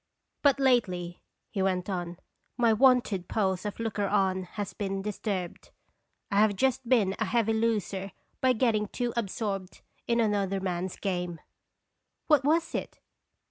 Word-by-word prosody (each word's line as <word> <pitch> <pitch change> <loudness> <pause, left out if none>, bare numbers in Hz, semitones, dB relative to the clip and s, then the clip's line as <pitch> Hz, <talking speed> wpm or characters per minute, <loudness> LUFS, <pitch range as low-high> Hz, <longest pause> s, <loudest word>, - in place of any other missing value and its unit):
"But 285 -1 +4
lately," 185 -10 +1 0.3
he 200 - -2
went 185 -1 0
on, 175 -3 -3 0.4
"my 235 -2 +4
wonted 235 -6 +3
pose 190 -2 0
of 205 - -6
looker 220 -3 -1
on 190 -2 +1
has 200 -2 -3
been 195 -1 -3
disturbed. 200 -3 -4 0.6
I 200 - +3
have 210 -1 +4
just 265 +2 0
been 210 -7 +4
a - - +1
heavy 225 -2 +1
loser 210 -4 -1 0.3
by 260 -1 +4
getting 220 -3 +1
too 240 +2 -3
absorbed 200 -4 -3 0.3
in 235 0 +2
another 200 -3 +1
man's 185 -1 -3
game." 180 -4 -3 0.9
"What 300 -4 +4
was 320 +4 +2
it? - - -4
205 Hz, 140 wpm, -28 LUFS, 190-235 Hz, 0.9 s, But